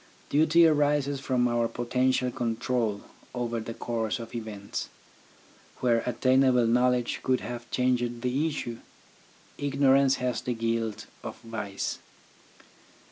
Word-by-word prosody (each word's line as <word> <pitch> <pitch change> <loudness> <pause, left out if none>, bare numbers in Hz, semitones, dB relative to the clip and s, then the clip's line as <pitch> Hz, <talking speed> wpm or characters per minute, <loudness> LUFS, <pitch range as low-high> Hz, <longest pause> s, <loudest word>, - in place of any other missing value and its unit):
Duty 160 +3 +5
arises 145 -2 +2
from 130 -2 +1
our 120 -1 +1
potential 125 +2 0
control 115 -3 -1 0.3
over 120 -1 -2
the 115 +1 -6
course 115 -2 -2
of 115 -2 -9
events. 110 -4 -5 0.9
Where 120 -2 +2
attainable 130 0 +3
knowledge 125 +1 +2
could 130 -1 +1
have 120 -1 -6
changed 120 -1 0
the 135 +5 +1
issue, 120 -7 -4 0.8
ignorance 140 -1 +4
has 125 -1 -2
the 125 -1 -2
guilt 115 -1 -2 0.2
of - - -6
vice. 110 -4 -4
125 Hz, 115 wpm, -28 LUFS, 115-130 Hz, 0.9 s, Duty